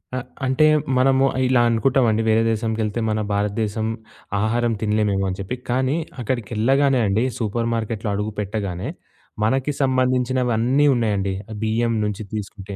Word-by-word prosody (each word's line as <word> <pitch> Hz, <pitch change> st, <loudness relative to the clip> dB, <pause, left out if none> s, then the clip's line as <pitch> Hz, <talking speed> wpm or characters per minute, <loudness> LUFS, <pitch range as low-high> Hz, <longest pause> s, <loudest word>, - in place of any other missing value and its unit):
ఆహ్, 130 Hz, -, -4 dB, 0.2 s
అంటే 130 Hz, +4 st, +3 dB, 0.3 s
మనము 135 Hz, +1 st, +4 dB, 0.2 s
ఇలా 125 Hz, -1 st, +4 dB
అనుకుంటామండి 115 Hz, -2 st, +2 dB
వేరే 110 Hz, +1 st, +4 dB
దేశంకెళ్తే 110 Hz, 0 st, -1 dB
మన 110 Hz, 0 st, 0 dB
భారతదేశం 105 Hz, +1 st, -1 dB, 0.6 s
ఆహారం 115 Hz, +2 st, +1 dB
తినలేమేమో 105 Hz, -2 st, +1 dB
అని 95 Hz, -, -4 dB
చెప్పి. 100 Hz, +6 st, -3 dB
కానీ, 130 Hz, +3 st, +1 dB, 0.3 s
అక్కడికెళ్ళగానే 125 Hz, +3 st, +1 dB
అండి, 100 Hz, +4 st, +1 dB, 0.2 s
సూపర్ 115 Hz, +1 st, -1 dB
మార్కెట్‌లో 110 Hz, -1 st, -2 dB
అడుగు 105 Hz, +2 st, -2 dB
పెట్టగానే, 100 Hz, -3 st, -3 dB, 0.5 s
మనకి 130 Hz, +6 st, +1 dB
సంబంధించినవన్నీ 130 Hz, 0 st, +2 dB
ఉన్నాయండి. 100 Hz, -5 st, 0 dB, 0.3 s
బియ్యం 115 Hz, +2 st, +1 dB
నుంచి 105 Hz, 0 st, -3 dB
తీసుకుంటే, 100 Hz, -1 st, -6 dB
115 Hz, 120 wpm, -22 LUFS, 105-125 Hz, 0.6 s, మనము